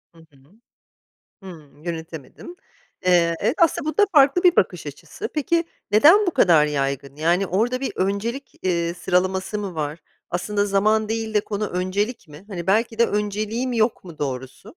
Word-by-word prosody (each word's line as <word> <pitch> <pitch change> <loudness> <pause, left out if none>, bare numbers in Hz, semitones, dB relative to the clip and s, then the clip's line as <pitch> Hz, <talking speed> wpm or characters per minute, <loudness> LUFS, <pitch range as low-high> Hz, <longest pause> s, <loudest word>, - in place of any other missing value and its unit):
Hı - - -19
hı. - - -24 1.1
Hıı 160 -6 -11 0.2
yönetemedin. 165 - -8 0.5
Eee, 170 -2 +3
evet, 230 +9 0
aslında 310 -2 +2
bu - - -6
da 415 - +6
farklı 290 +3 +5
bir 360 -1 +5
bakış - - +1
açısı. 440 - -7
Peki 335 +3 +1 0.3
neden 325 - +6
bu - - +2
kadar 170 - +5
yaygın? 140 -1 -3
Yani 175 +5 +1
orada 235 +8 0
bir 270 - -2
öncelik, 225 +8 -3
eee, 170 -2 0
sıralaması 190 +3 -1
mı 195 -4 -5
var? 150 +1 -3 0.3
Aslında 205 +3 -1
zaman 215 +2 +1
değil 225 -1 -3
de 210 - +4
konu 210 0 -3
öncelik 185 +4 -2
mi? 150 +6 -14
Hani 180 -4 -6
belki 225 +3 +1
de 235 - +6
önceliğim 215 +4 -2
yok 225 0 0
mu 170 -4 -12
doğrusu? 130 0 -5
200 Hz, 165 wpm, -22 LUFS, 170-230 Hz, 1.1 s, da